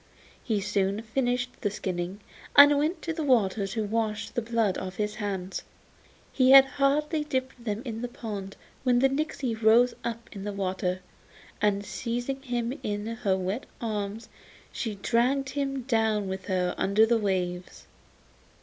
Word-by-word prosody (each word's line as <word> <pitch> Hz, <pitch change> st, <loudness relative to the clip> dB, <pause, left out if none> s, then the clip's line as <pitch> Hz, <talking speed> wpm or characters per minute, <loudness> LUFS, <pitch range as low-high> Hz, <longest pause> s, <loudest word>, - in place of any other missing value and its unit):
He 215 Hz, -4 st, 0 dB
soon 200 Hz, +1 st, 0 dB
finished 245 Hz, +1 st, -1 dB
the 205 Hz, -, +1 dB
skinning, 185 Hz, 0 st, -4 dB, 0.3 s
and 285 Hz, 0 st, +9 dB
went 320 Hz, +3 st, -1 dB
to 330 Hz, -, -2 dB
the 320 Hz, -, -4 dB
water 220 Hz, -7 st, +2 dB
to 220 Hz, +3 st, -2 dB
wash 215 Hz, 0 st, -2 dB
the 240 Hz, -, -1 dB
blood 225 Hz, -4 st, 0 dB
off 185 Hz, 0 st, -6 dB
his 210 Hz, 0 st, -2 dB
hands. 195 Hz, -3 st, -3 dB, 0.7 s
He 255 Hz, -1 st, +4 dB
had 270 Hz, 0 st, +10 dB
hardly 290 Hz, +3 st, +1 dB
dipped 260 Hz, -4 st, -3 dB
them 215 Hz, 0 st, -3 dB
in 225 Hz, -2 st, -4 dB
the 245 Hz, -, -2 dB
pond 205 Hz, -5 st, -7 dB, 0.2 s
when 250 Hz, -2 st, +3 dB
the 270 Hz, +2 st, +4 dB
nixy 275 Hz, -3 st, -2 dB
rose 230 Hz, +2 st, +4 dB
up 230 Hz, 0 st, -4 dB
in 195 Hz, -2 st, -7 dB
the 205 Hz, 0 st, -4 dB
water, 185 Hz, -1 st, -2 dB, 0.6 s
and 205 Hz, -1 st, +1 dB
seizing 245 Hz, +5 st, -3 dB
him 245 Hz, -2 st, -2 dB
in 205 Hz, 0 st, -3 dB
her 220 Hz, -4 st, 0 dB
wet 190 Hz, +6 st, -3 dB
arms 215 Hz, -2 st, -3 dB, 0.4 s
she 220 Hz, -4 st, -3 dB
dragged 250 Hz, +6 st, +1 dB
him 275 Hz, -2 st, -2 dB
down 220 Hz, -4 st, +1 dB
with 190 Hz, 0 st, -5 dB
her 180 Hz, -2 st, 0 dB
under 205 Hz, +3 st, +4 dB
the 230 Hz, 0 st, +2 dB
waves. 180 Hz, -3 st, -2 dB
225 Hz, 160 wpm, -27 LUFS, 200-255 Hz, 0.7 s, had